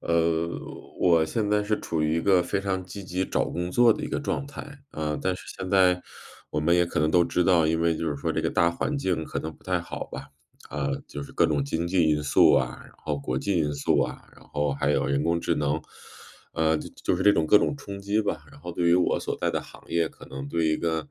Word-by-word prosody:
呃， 85 0 +1 0.5
我 85 -3 +5
现 105 +6 -1
在 105 0 +2
是 105 0 0
处 80 -2 -2
于 75 +1 +1
一 - - +1
个 95 0 +4
非 100 - -1
常 95 -2 -2
积 100 +2 -8
极 90 0 -2
找 - - 0
工 90 +1 -3
作 120 +4 +5
的 - - 0
一 - - -5
个 - - -2
状 140 -1 -2
态， 140 - -8 0.3
啊， 75 -1 -3
但 95 0 0
是 - - -9 0.2
现 95 - -4
在 90 -2 +5 0.5
我 - - -1
们 85 +3 +3
也 90 - +4
可 85 - -2
能 75 +1 +2
都 85 +1 +4
知 90 - +1
道， 85 -3 +4
因 80 +1 +1
为 85 -1 +2
就 85 - -3
是 70 - -3
说 70 - -2
这 - - -1
个 - - 0
大 85 0 +3
环 145 - -2
境 90 - -1
可 - - -4
能 80 - -4
不 - - -26
太 90 -1 0
好 85 - -6
吧， 70 +2 -7 0.4
啊， 70 -1 -2 0.2
就 75 - -6
是 70 - -10
各 - - +3
种 75 -3 0
经 80 +4 -2
济 90 -2 +3
因 75 -1 +2
素 70 - +5
啊， - - +1
然 - - -16
后 75 -2 -3
国 65 -2 -2
际 100 +6 -1
因 75 -2 0
素 70 0 +1
啊， - - -6
然 - - -18
后 75 -1 -1
还 70 +1 0
有 75 - +1
人 70 0 +1
工 85 +1 +1
智 - - 0
能， 75 +1 0 0.7
呃， 80 0 +2
就 - - -7
就 - - +1
是 95 - -1
这 105 - +6
种 80 -4 +1
各 105 - +7
种 105 - +2
冲 100 -5 -7
击 100 +2 0
吧。 105 - -3
然 - - -15
后 85 - -6
对 85 - -2
于 85 - +6
我 90 0 +2
所 - - -3
在 - - +1
的 - - 0
行 - - -14
业 85 -1 +1
可 - - -15
能 70 +1 -7
对 80 +3 0
一 80 - +2
个， 80 - -2
85 Hz, 285 characters per minute, -26 LUFS, 75-95 Hz, 0.7 s, 各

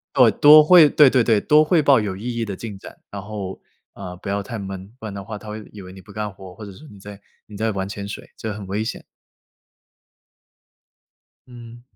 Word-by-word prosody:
哦， - - +6
多 150 +1 +7
汇 165 -1 +7
对 145 -1 +5
对 125 -2 +3
对， 110 -3 +2
多 150 +6 +4
汇 160 0 +2
报 140 -4 +4
有 100 -3 -4
意 115 +4 -5
义 115 - -1
的 100 -3 -6
进 110 -3 -8
展。 - - -13
然 100 -1 -7
后， 100 -2 -7 0.3
呃， 90 -2 -9
不 95 - -10
要 100 +1 -2
太 115 +2 -7
闷， 95 0 -8
不 110 - -9
然 100 - -7
的 100 - -7
话 105 0 -7
他 105 - -13
会 105 0 -7
以 105 -2 -11
为 90 - -12
你 95 - -13
不 100 +2 -16
干 105 -1 -5
活 95 -1 -13
儿， - - -15
或 110 - -11
者 100 - -10
说 150 +11 -15
你 100 - -15
在 100 +1 -12 0.3
你 105 - -12
在 110 +2 -1
玩 95 -2 -4
潜 100 0 -7
水， - - -9
这 110 - -5
很 100 -1 -8
危 100 +3 -3
险。 110 - -6 2.4
嗯。 120 -1 -13
105 Hz, 250 characters per minute, -21 LUFS, 100-115 Hz, 2.4 s, 多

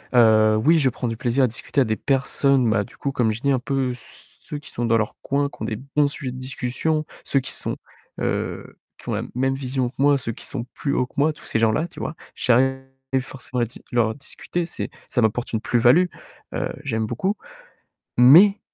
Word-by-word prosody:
heu, 110 -2 +6
oui, 160 +2 +5
je 135 -3 +3
prends 125 +1 -4
du 115 -1 -3
plaisir 125 +3 +1
à - - +5
discuter 120 +4 -1
à - - +6
des 110 -2 0
personnes, 135 -1 +2
bah, 105 -2 +2
du - - -17
coup, 140 - -2
comme 120 -5 +1
j'ai 110 - -5
dit 140 0 +2
un 130 - +2
peu 135 0 -1
ceux 135 +4 -10
qui 145 - -12
sont 120 - -2
dans 115 0 +3
leur 110 -1 -1
coin, 140 +1 0
qui - - -17
ont - - -1
des 110 - -2 0.2
bons 150 -1 +5
sujets 140 -2 -5
de 125 - -8
discussion, 135 +4 -2 0.2
ceux 140 - +2
qui 135 - -3
sont, - - -2 0.5
heu, - - -3 0.2
qui - - -10
ont - - 0
la - - -1
même 135 +1 +1
vision 130 -2 -1
que 130 - -19
moi, 145 0 +5
ceux 115 -3 -4
qui - - -8
sont 120 -4 -4
plus 140 - -2
haut 125 - +1
que 125 - -23
moi, 150 +2 +3
tous - - -17
ces 115 - -1
gens-là, 115 +9 +2
tu 175 - -12
vois, 155 - -4 0.2
j'arrive 135 +2 +2 0.4
forcément 130 -1 -4
à 120 - +3
dis 115 - -12
leur 115 -2 +2
discuter, 165 +4 -4
c'est - - -3 0.2
ça 125 - 0
m'apporte 115 +2 0
une 110 - 0
plus-value, 120 +11 +4 0.5
heu, - - -2
j'aime 110 -5 -1
beaucoup 185 - -1 0.8
mais 175 - +8
130 Hz, 225 wpm, -23 LUFS, 115-140 Hz, 0.8 s, mais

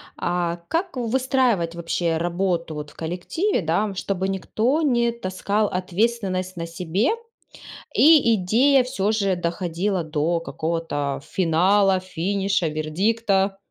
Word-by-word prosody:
А, 175 -1 -1
как 350 +1 -1
выстраивать 245 -7 +1
вообще 170 0 -1
работу, 170 -1 -1
вот, 150 -1 -6
в - - -22
коллективе, 180 - -1
да, 190 +5 0
чтобы 190 0 -2
никто 225 - 0
не 240 -5 +2
таскал 205 -1 -1
ответственность 185 0 -1
на 165 -1 -4
себе 180 - -1 0.9
и 295 -6 +6
идея 250 +8 +3
всё 215 -5 -1
же 200 -4 +1
доходила 175 +2 -1
до 160 +2 -1
какого-то 160 -4 -3
финала, 190 +4 +2
финиша, 190 0 -1
вердикта? 195 +6 0
185 Hz, 115 wpm, -23 LUFS, 170-220 Hz, 0.9 s, и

